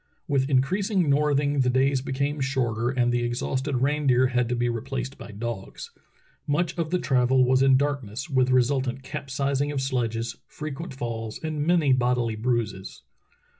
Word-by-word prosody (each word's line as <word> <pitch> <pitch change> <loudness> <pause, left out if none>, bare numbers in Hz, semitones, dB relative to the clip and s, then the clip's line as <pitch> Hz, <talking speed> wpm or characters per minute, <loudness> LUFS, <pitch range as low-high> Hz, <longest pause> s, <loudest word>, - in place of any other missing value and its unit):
With 140 -2 +1
increasing 180 - +2
northing 145 0 +2
the 125 -1 +3
days 130 +1 +2
became 140 +2 -2
shorter 120 -4 0
and 125 -2 +1
the 120 - +1
exhausted 130 +2 -1
reindeer 135 -3 +3
had 125 -2 0
to 125 - 0
be 120 0 0
replaced 130 +3 -3
by - - -9
dogs. 110 -1 -6 0.6
Much 165 +4 0
of 165 -2 -2
the 180 - +1
travel 130 -2 +3
was 130 +1 +3
in 135 -1 +5
darkness, 135 -4 -2
with 130 -4 +2
resultant 130 0 +1
capsizings 140 0 -2
of 140 - -1
sledges, 115 -3 -2
frequent 155 0 -7
falls, 115 -3 -4
and 155 -1 -2
many 165 -6 +4
bodily 120 -2 +1
bruises. 110 -4 -2
130 Hz, 155 wpm, -25 LUFS, 120-140 Hz, 0.6 s, in